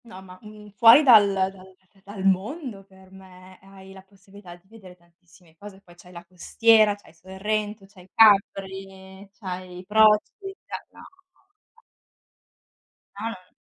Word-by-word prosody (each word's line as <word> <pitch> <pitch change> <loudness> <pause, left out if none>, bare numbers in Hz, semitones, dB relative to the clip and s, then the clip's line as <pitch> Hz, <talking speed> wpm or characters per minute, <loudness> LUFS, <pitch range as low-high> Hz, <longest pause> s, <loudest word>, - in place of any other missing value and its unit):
No, 230 -5 -13
ma, 185 -1 -15
mhmm, 210 -1 -15
fuori 235 +5 +7
dal 215 -7 +5
dal 190 -1 -2
da 190 -1 -17 0.3
da 195 - -28
dal 200 -1 -10
mondo 205 - -3
per 190 -1 -22
me, 185 -1 -17
hai 190 0 -16
la 190 - -14
possibilità 195 -1 -17
di 175 +2 -27
vedere 195 -4 -16
tantissime 170 -1 -27
cose, 200 -2 -13
poi 175 -3 -20
c'hai 180 +1 -19
la 175 -1 -13
costiera, 215 +4 +2
c'hai 205 - -22
Sorrento, 205 +4 -6
c'hai 190 -2 -20
Capri, 195 -2 0
c'hai 185 -2 -9
Proci 210 0 +3 0.6
no, - - -17 0.3
no, - - -35 0.3
no. 465 - -28 1.4
No, 220 - -5
no, 230 - -8
n - - -42
195 Hz, 155 wpm, -23 LUFS, 185-210 Hz, 1.4 s, fuori